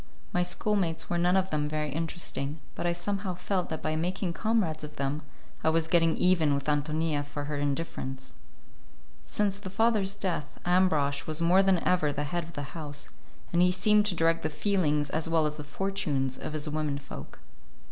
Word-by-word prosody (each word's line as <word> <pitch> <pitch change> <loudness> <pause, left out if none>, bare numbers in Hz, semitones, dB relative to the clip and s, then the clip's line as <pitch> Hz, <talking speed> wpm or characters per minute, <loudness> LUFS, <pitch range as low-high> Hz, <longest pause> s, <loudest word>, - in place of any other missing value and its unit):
My 180 - +2
schoolmates 180 -1 0
were 175 - +1
none 180 +2 +4
of 190 0 0
them 150 -1 0
very 150 -1 -2
interesting, 160 -2 -3
but - - -2
I - - +3
somehow 190 +2 -2
felt 180 0 -1
that 160 - -4
by 155 0 0
making 175 +2 -1
comrades 195 -8 0
of 150 0 -8
them 140 +2 -2 0.4
I - - +4
was 160 0 +2
getting 165 -1 +3
even 165 -6 +4
with 140 0 -3
Ántonia 150 0 0
for 145 0 -5
her 145 0 -3
indifference. 140 -2 -3 0.9
Since 200 - -1
the 195 - -6
father's 205 -1 +2
death, 175 -7 -3
Ambrosch 155 -6 +2
was 155 -1 -1
more 175 +3 +5
than 195 -1 +4
ever 175 -5 +3
the 145 +1 -2
head 175 +4 -2
of 165 +1 -11
the 145 -2 -6
house 145 -3 -5 0.4
and 170 - +4
he 180 - +6
seemed 210 +3 +4
to 190 - +2
direct 165 0 +2
the 155 - -1
feelings 150 -3 +1
as 160 +1 0
well 165 -1 +3
as 150 0 -1
the 150 - -5
fortunes 145 -5 -1
of 155 - -6
his 155 0 -1
women 150 -1 -1
folk. 135 - -9
165 Hz, 190 wpm, -29 LUFS, 150-180 Hz, 0.9 s, he